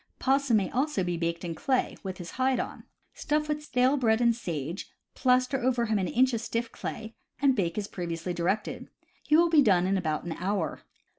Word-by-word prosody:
Possum 270 -3 +2
may 190 -3 -1
also 265 -6 0
be 175 -1 -1
baked 170 +1 -2
in 170 - -3
clay, 255 - 0
with 190 -1 -5
his 175 -2 -8
hide 260 0 +1
on. - - -5 0.3
Stuff 300 0 -1
with 300 0 -2
stale 260 -1 +2
bread 225 -4 +2
and 235 -1 +3
sage, 170 - -5 0.2
plaster 255 +1 +2
over 245 -1 +1
him 215 -2 +1
an 185 - 0
inch 255 +6 +3
of 230 - -1
stiff 230 0 -3
clay, 220 0 -6 0.3
and 275 -1 +4
bake 175 -5 -1
as 205 -1 -2
previously 175 -1 -4
directed. 185 +5 -2 0.3
He 305 - +3
will 340 0 +4
be 310 -3 +7
done 185 -8 +4
in 190 +1 +1
about 155 -4 -2
an 175 - -5
hour. 180 -1 -2
220 Hz, 205 wpm, -28 LUFS, 180-260 Hz, 0.3 s, be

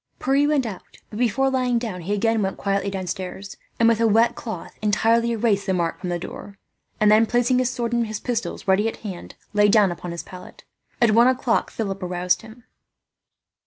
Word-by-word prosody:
Pierre 275 +2 +2
went 295 -4 +1
out, 200 -5 -8
but 210 - -6
before 265 +3 +1
lying 250 -2 +1
down 220 -7 -4
he 190 +5 -2
again 225 +1 +1
went 190 -1 -2
quietly 200 0 -1
downstairs 190 +1 -5 0.2
and, 230 - +5
with 230 -1 +3
a 230 - +4
wet 225 +2 +4
cloth, 220 -8 -7
entirely 225 +2 +2
erased 215 -3 0
the 190 - +1
mark 170 -2 -1
from 180 - -5
the 175 - -1
door; 195 +3 -9 0.4
and 210 0 +5
then, 220 +1 +5
placing 245 +2 +2
his 255 -1 +1
sword 240 -2 -3
and 235 -1 +1
his 215 -1 -5
pistols 235 -3 -4
ready 195 +3 +3
at 225 - -5
hand, 185 -4 -7 0.2
lay 205 0 +4
down 205 -3 +4
on 175 - -5
his 170 - -6
pallet. 180 -1 -12 0.4
At 235 -2 +4
one 235 +3 +5
o'clock 255 -2 +1
Philip 195 -3 -4
aroused 180 0 0
him. 225 +2 -14
215 Hz, 200 wpm, -23 LUFS, 195-235 Hz, 0.4 s, and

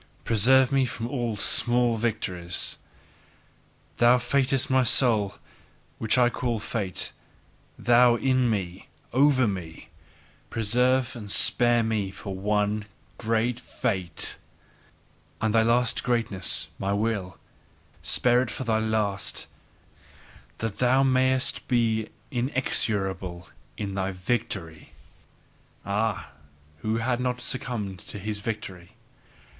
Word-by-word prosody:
Preserve 125 +4 +4
me 135 -1 +3
from 115 -2 -3
all 120 -4 -2
small 120 +3 +2
victories! 95 -6 -2 1.2
Thou 120 +1 +6
fatedness 135 +2 +1
of - - -7
my 130 0 +4
soul, 110 -4 +2 0.6
which 110 +3 +1
I 125 -1 +5
call 120 -1 -1
fate! 100 -4 -3 0.7
Thou 120 0 +5
In 130 0 +2
me! 95 -4 -3 0.3
Over 130 -1 +4
me! 90 -5 -6 0.6
Preserve 125 +3 +1
and 105 -4 -8
spare 120 +3 +4
me 110 -3 -1
for 100 +1 -7
one 105 +2 0 0.3
great 115 +1 0
fate! 95 -8 -1 1.0
And 110 -1 0
thy 115 - +5
last 120 +1 +2
greatness, 115 -6 0
my 100 +1 -1
Will, 100 -3 -2 0.6
spare 125 0 +3
it 130 - -2
for - - -5
thy 110 -2 +1
last 110 -3 -1 1.1
that 110 -3 -4
thou 130 +2 +4
mayest 130 0 +1
be 115 -3 +1 0.2
inexorable 100 -8 -2 0.3
IN 100 -2 -4
thy 95 -1 -1
victory! 95 -5 -3 0.9
Ah, 100 -6 -1 0.5
who 110 +5 -1
hath 120 +2 0
not 125 -1 -1
succumbed 110 -7 -3
to - - -9
his 105 +1 -4
victory! 95 -5 -6
115 Hz, 110 wpm, -26 LUFS, 100-125 Hz, 1.2 s, Thou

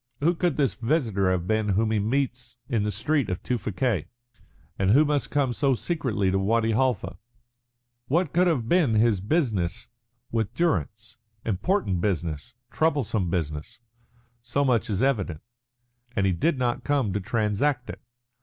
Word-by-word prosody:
Who 165 +5 +3
could 175 -3 0
this 140 -3 +2
visitor 115 - 0
have 90 -2 0
been 110 +1 0
whom 110 +3 +1
he 110 - +2
meets 120 +2 -2
in 115 -6 0
the 105 +1 0
street 145 -3 0
of 90 - -3
Tewfikieh, 110 - -1 0.7
and 95 0 +2
who 140 +9 +6
must 145 -1 0
come 140 -4 +1
so 135 +2 +2
secretly 120 - -1
to 95 - +1
Wadi 115 +3 +2
Halfa? 115 -6 0 0.9
What 165 +2 +1
can 180 +2 +4
have 135 -10 0
been 150 -7 +3
his 110 -3 +3
business 105 - -1 0.4
with 115 0 -1
Durrance? 105 - -1 0.3
Important 105 - 0
business, 85 - -2 0.2
troublesome 115 - 0
business 85 +6 -3 0.6
so 125 +4 0
much 120 -6 +1
is 105 +2 0
evident. 100 - 0 0.7
And 100 - +1
he 95 - +3
did 130 - +1
not 120 -2 -1
come 135 -9 0
to 105 - 0
transact 115 +6 0
it. - - -11
115 Hz, 155 wpm, -26 LUFS, 100-140 Hz, 0.9 s, who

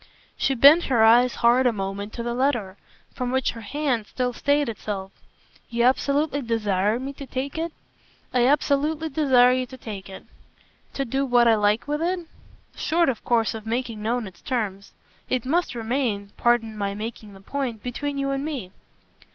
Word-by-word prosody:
She 270 - 0
bent 290 +7 +7
her 240 -5 +3
eyes 240 +2 +5
hard 250 +2 +5
a - - +4
moment 200 0 -4
to 235 - -5
the 240 0 -2
letter, 240 -7 0 0.4
from 250 -1 -3
which 260 0 +1
her 230 - -9
hand 245 -1 -2
still 250 -1 -2
stayed 285 +3 +1
itself. 200 -4 -5 0.6
"You 235 0 0
absolutely 280 +3 +2
DESIRE 210 -3 0
me 270 +2 -5
to 275 0 -9
take 265 +2 -4
it?" 330 +1 -2 0.6
"I 245 -1 +4
absolutely 300 +2 +1
desire 265 -5 +4
you 255 0 0
to 260 - -11
take 205 -5 -8
it." 190 - -10 0.7
"To 275 - -1
do 270 +3 -1
what 245 -3 +4
I 230 - +6
like 210 +2 +1
with 295 +1 -1
it?" 355 +2 0 0.5
"Short 335 0 +1
of 240 - -3
course 230 -2 +1
of 220 -1 -8
making 230 -2 -2
known 235 +2 -1
its 185 -3 -12
terms. 205 -6 -3 0.4
It 255 -2 -1
must 330 +1 0
remain 225 -4 -2
pardon 240 -2 +1
my 200 -1 -2
making 215 -1 -7
the 195 - -13
point 245 -1 -4
between 280 +3 -3
you 275 0 -1
and 275 0 -2
me." 275 -12 -5
245 Hz, 180 wpm, -24 LUFS, 220-275 Hz, 0.7 s, bent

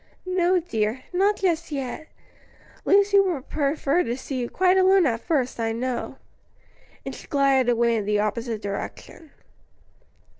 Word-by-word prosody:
"No, 365 0 +2
dear, 230 -6 -2
not 395 +3 +3
just 340 -4 -1
yet. 275 +2 -5 0.8
Lucy 400 0 +5
would 350 -9 -1
prefer 295 +2 0
to 240 -5 -2
see 265 0 -5
you 240 - -3
quite 370 0 +2
alone 380 -1 +5
at 230 -5 0
first, 270 -8 -1
I 225 -1 -1
know." 245 +1 -3 0.9
And - - -5
she - - -12
glided 275 -3 +2
away 235 -1 +2
in 210 - -3
the 210 0 +1
opposite 220 +1 -2
direction. 205 +9 -7
275 Hz, 145 wpm, -24 LUFS, 235-360 Hz, 0.9 s, Lucy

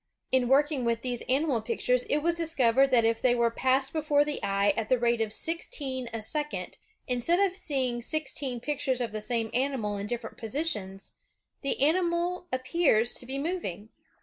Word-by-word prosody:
In 255 -2 +3
working 280 +1 +3
with 230 -1 0
these 245 -2 -1
animal 270 -2 +2
pictures, 245 +2 0
it 295 +1 0
was 340 +1 +2
discovered 275 -6 +3
that 240 -3 +4
if 225 0 +1
they 245 -1 +4
were 235 -1 +2
passed 265 +3 +1
before 295 -2 +2
the 295 -1 -3
eye 200 +1 +2
at 220 -1 -3
the 255 - +4
rate 235 -1 +1
of 220 -1 -1
sixteen 270 -5 -2
a 225 -1 -4
second, 300 +6 -4 0.3
instead 250 +8 +1
of 390 -2 +2
seeing 260 -8 0
sixteen 270 -2 -2
pictures 265 -1 -1
of 240 -3 -2
the 215 0 -4
same 225 0 -2
animal 250 -6 -1
in 200 +1 -4
different 240 +1 -5
positions, 220 -7 -3 0.5
the 275 - -1
animal 345 +3 +1
ap 255 0 -2
pears 255 -6 +2
to 245 - -5
be 265 +1 -3
moving. 275 - -4
255 Hz, 180 wpm, -28 LUFS, 230-295 Hz, 0.5 s, that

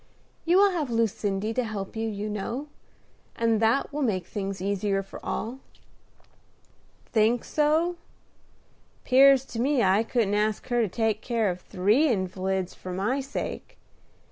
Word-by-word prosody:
"You 345 +2 +4
will 400 0 +6
have 315 -7 -2
Lucindy 215 -2 -1
to 255 - 0
help 210 -3 -5
you, 225 0 -2
you 210 0 -4
know; 230 +8 -4 0.7
and 230 -1 +1
that 230 +6 +2
will 295 - -2
make 195 -9 0
things 195 0 -4
easier 195 +1 -1
for 195 - -11
all." 240 +4 -4 1.5
"Think 225 +2 +2
so? 315 +4 +1 1.1
'Pears 270 0 +6
to 230 - -7
me 270 -1 +2
I 190 +2 +4
couldn't 225 -3 0
ask 210 0 0
her 240 -1 +2
to 220 - +1
take 220 +1 0
care 230 -5 0
of 180 0 -7
three 210 - +2
invalids 190 -4 -1
for 185 - -8
my 205 +9 -1
sake. 275 +1 -6
220 Hz, 145 wpm, -26 LUFS, 195-260 Hz, 1.5 s, will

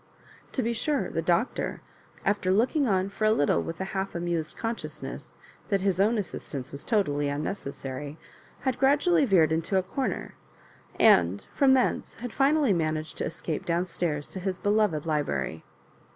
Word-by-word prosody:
To 260 - 0
be 235 +1 0
sure 255 - -1
the 165 - -1
Doctor, 175 - 0 0.5
after 200 -2 +1
look 225 - +2
ing 290 -4 +3
on 190 -2 +2
for 215 +2 -2
a 215 - +5
little 145 -9 +2
with 165 - -6
a - - -1
half 195 -1 -2
amused 170 -2 -2
conscious 225 0 -4
ness - - -7 0.4
that 200 -3 +2
his 190 -1 +2
own 220 +4 +3
assistance 140 -9 -5
was 140 - -5
totally 145 -11 +1
unneces 145 +1 -3
sary, 140 +3 -6 0.4
had 260 -2 -1
gradually 290 +4 +4
veered 175 - +4
into 165 +4 +1
a 190 - +2
corner, 265 +8 -3 0.7
and 90 +3 +5
from 270 -1 +5
thence 255 - 0
had 245 -1 -7
finally 280 -3 +3
managed 155 -2 -1
to - - 0
escape 160 -1 -4
down 170 +1 0
stairs 165 -4 -2
to 190 - -5
his 185 0 -2
beloved 205 -8 +1
library. 145 - -1
185 Hz, 170 wpm, -27 LUFS, 155-225 Hz, 0.7 s, a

